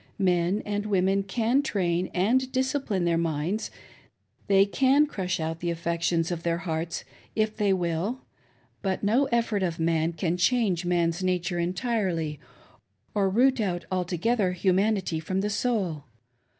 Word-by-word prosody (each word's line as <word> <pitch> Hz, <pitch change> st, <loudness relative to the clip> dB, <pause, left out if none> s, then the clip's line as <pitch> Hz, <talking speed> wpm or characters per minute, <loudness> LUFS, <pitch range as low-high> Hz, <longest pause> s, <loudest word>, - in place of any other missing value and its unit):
Men 180 Hz, 0 st, +1 dB
and 205 Hz, 0 st, -2 dB
women 195 Hz, 0 st, +2 dB
can 230 Hz, +7 st, +1 dB
train 185 Hz, -, -1 dB
and 250 Hz, +8 st, +1 dB
discipline 260 Hz, -8 st, 0 dB
their 170 Hz, -1 st, +2 dB
minds, 165 Hz, +5 st, -1 dB, 0.8 s
they 195 Hz, 0 st, +5 dB
can 270 Hz, +7 st, +3 dB
crush 185 Hz, -, -3 dB
out 160 Hz, 0 st, -3 dB
the' 170 Hz, -, -2 dB
affections 170 Hz, 0 st, 0 dB
of 170 Hz, -1 st, -3 dB
their 170 Hz, 0 st, 0 dB
hearts 165 Hz, -1 st, -3 dB, 0.3 s
if 215 Hz, 0 st, 0 dB
they 210 Hz, -2 st, +1 dB
will; 180 Hz, +6 st, -1 dB, 0.6 s
but 190 Hz, 0 st, -2 dB
no 235 Hz, +7 st, +3 dB
effort 235 Hz, -5 st, 0 dB
of 170 Hz, -3 st, -1 dB
man 165 Hz, 0 st, +1 dB
can 165 Hz, +1 st, -1 dB
change 190 Hz, -3 st, +2 dB
man's 175 Hz, 0 st, +1 dB
nature 180 Hz, -1 st, 0 dB
entirely 175 Hz, -, -1 dB, 0.7 s
or 195 Hz, -2 st, +2 dB
root 250 Hz, +5 st, +3 dB
out 180 Hz, -4 st, -2 dB
altogether 185 Hz, +3 st, 0 dB
humanity 190 Hz, -1 st, +1 dB
from 185 Hz, +4 st, -2 dB
the 210 Hz, +1 st, -1 dB
soul. 195 Hz, -, -1 dB
185 Hz, 140 wpm, -27 LUFS, 170-215 Hz, 0.8 s, they